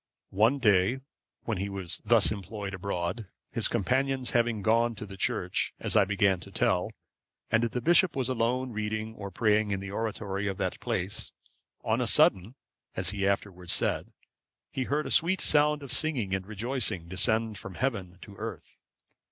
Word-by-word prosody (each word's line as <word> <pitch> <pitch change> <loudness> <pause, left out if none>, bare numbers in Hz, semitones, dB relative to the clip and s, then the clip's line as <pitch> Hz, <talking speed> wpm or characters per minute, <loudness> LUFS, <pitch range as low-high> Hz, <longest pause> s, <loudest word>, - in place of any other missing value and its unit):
One 110 +8 +3
day, 110 +1 +3 0.4
when 110 -5 -2
he 100 +1 -2
was 95 -3 -4
thus - - +4
employed 100 -1 -5
abroad, 95 +2 -3 0.2
his 115 - +3
companions 130 +3 0
having 115 -3 +1
gone 115 +2 +2
to 105 - -7
the 100 -1 -10
church, 95 - -1
as - - -1
I - - +6
began 100 -1 +2
to 95 - -12
tell, 90 -2 +1 0.6
and 115 0 +4
the 120 +1 -1
bishop 175 +1 +4
was 130 -3 -1
alone 125 +1 0
reading 110 0 -3
or 100 -3 -7
praying 105 +2 +2
in 100 -2 -1
the 100 0 -7
oratory 105 -2 -3
of 95 -1 -3
that - - -2
place, 95 +4 -2 0.5
on - - +1
a - - 0
sudden, 95 +7 +3 0.4
as - - +2
he 100 -1 -1
afterwards 95 -3 -1
said, - - +2 0.6
he 130 - -2
heard 150 +3 -1
a - - -4
sweet 185 +3 +4
sound 150 0 +3
of 140 - -7
singing 130 -12 +1
and 95 -1 -2
rejoicing 110 -5 -2
descend 110 +4 0
from 95 - -9
heaven 100 -9 -2
to 100 - -12
earth. - - -7
110 Hz, 170 wpm, -28 LUFS, 95-120 Hz, 0.6 s, I